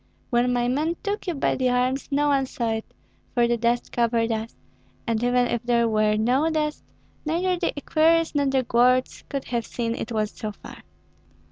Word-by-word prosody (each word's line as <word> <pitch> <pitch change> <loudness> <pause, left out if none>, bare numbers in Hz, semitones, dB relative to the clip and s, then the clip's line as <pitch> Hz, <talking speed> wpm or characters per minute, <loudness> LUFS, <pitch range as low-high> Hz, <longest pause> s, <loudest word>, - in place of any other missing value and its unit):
When 245 +1 +2
my 245 -1 +1
men 305 +7 0
took 410 -1 -3
you 350 - -1
by 275 - +1
the 255 -1 +1
arms 250 +2 0
no 290 +1 +2
one 270 -2 +2
saw 235 -3 -2
it, 220 0 -4 0.4
for 240 -1 +4
the 240 - +2
dust 235 +1 0
covered 235 -1 +1
us; 220 +1 -3 0.5
and 230 -1 -1
even 245 0 +3
if 240 -1 -1
there 235 -1 +2
were 215 -1 +2
no 255 +8 +2
dust, 305 -1 -2 0.4
neither 350 +4 0
the 350 - -1
equerries 325 +3 +2
nor 285 -2 +1
the 265 -1 +2
guards 250 +2 +2
could 275 -1 -3
have 235 -2 -2
seen, 230 -1 -2
it 230 - -5
was 215 -2 -1
so 215 -1 -6
far. - - -12
245 Hz, 195 wpm, -24 LUFS, 235-285 Hz, 0.5 s, for